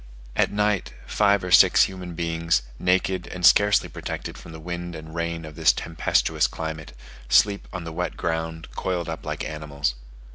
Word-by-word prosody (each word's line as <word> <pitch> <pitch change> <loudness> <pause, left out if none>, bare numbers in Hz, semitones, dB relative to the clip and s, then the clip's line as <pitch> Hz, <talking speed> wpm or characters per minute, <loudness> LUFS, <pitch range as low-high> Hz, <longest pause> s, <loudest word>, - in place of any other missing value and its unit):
At - - +2
night, 105 -1 0
five 100 -2 +2
or 90 - -4
six - - +7
human 90 -2 -5
beings, 85 -4 0 0.2
naked 90 0 +1
and 90 -1 -2
scarcely 105 +2 +5
protected - - -6
from - - -11
the 80 - -9
wind 85 +1 -5
and 80 0 -9
rain 85 -1 -3
of 75 - -9
this 80 +1 +4
tempestuous 80 0 0
climate, 80 -5 -6 0.3
sleep 100 +10 +3
on 90 -2 -5
the 85 -1 -7
wet 90 +2 -3
ground 80 -1 -3
coiled 90 -2 -2
up 80 - -6
like - - -3
animals. 75 -4 -3
85 Hz, 170 wpm, -24 LUFS, 80-90 Hz, 0.3 s, six